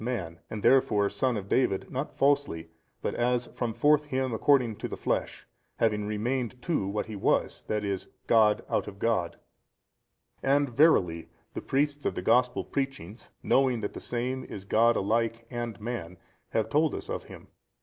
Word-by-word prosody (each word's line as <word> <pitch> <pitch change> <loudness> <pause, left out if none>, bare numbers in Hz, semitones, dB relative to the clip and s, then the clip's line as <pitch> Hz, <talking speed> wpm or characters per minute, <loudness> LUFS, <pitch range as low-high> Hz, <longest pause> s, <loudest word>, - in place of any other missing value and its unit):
man, 90 -9 -3
and 105 -2 -6
therefore 115 -7 +4
son 130 -3 0
of 100 -1 -6
David 100 -4 +1
not 135 +3 -3
falsely 140 - +1 0.4
but - - -1
as 120 0 +1
from 120 -2 -2
forth 150 +5 +3
him 130 -3 -1
according 125 -2 +3
to - - -4
the - - -6
flesh, - - -2 0.3
having 105 -2 +1
remained 120 +3 -2
too 125 - -1
what 105 +2 -2
He 110 - -7
was, 100 - 0
i. 105 - +1
e. 100 -2 -1 0.3
God 110 -2 +4
out - - -1
of 100 - -8
God. 100 -6 0 1.0
And 140 +1 +2
verily 95 - +3 0.2
the - - -4
priests 145 +1 0
of - - -2
the - - -4
gospel 125 0 +3
preachings, 135 -7 -4
knowing 130 -4 +3
that 100 - -3
the - - -6
Same 125 +2 -3
is 100 - -8
God 115 +4 +4
alike 115 +3 0
and 120 -3 -4
man, 105 -6 -5 0.3
have 110 - 0
told 155 0 +2
us - - -6
of - - -4
Him. - - -13
120 Hz, 170 wpm, -28 LUFS, 105-130 Hz, 1.0 s, therefore